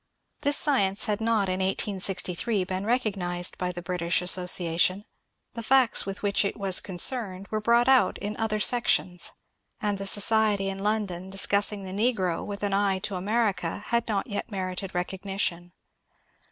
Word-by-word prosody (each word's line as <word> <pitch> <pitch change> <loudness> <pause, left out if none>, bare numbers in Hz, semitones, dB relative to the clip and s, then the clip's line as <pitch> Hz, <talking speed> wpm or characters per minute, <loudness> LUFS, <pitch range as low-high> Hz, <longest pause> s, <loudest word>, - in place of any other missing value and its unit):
This 285 0 +3
science 200 -10 +1
had 210 -1 -2
not 220 -3 +1
in 185 0 -2
1863 190 +1 0
been 185 +2 -4
recognized 190 -7 0
by 180 0 -1
the 175 -1 -8
British 170 0 0
Association; 180 +1 +2 0.5
the 230 - -5
facts 250 -3 +3
with 195 +1 -6
which 200 0 +2
it 200 - -3
was 195 -3 +3
concerned 195 0 -1
were 215 0 -1
brought 235 +3 +3
out 265 -1 +4
in 205 +1 -5
other 215 -1 -1
sections, 210 -7 +1 0.5
and 205 -2 -1
the 195 - -2
society 205 -1 +3
in 195 0 -5
London 195 -3 -2
discussing 200 +1 +2
the 190 - -6
n^ro 195 -4 0
with 205 0 -7
an 200 -1 0
eye 195 -1 +2
to 190 - -5
America 200 -2 -1
had 235 -1 0
not 205 -3 -1
yet 205 -5 -5
merited 190 -1 -5
recognition. 180 -1 -3
195 Hz, 155 wpm, -26 LUFS, 185-215 Hz, 0.5 s, out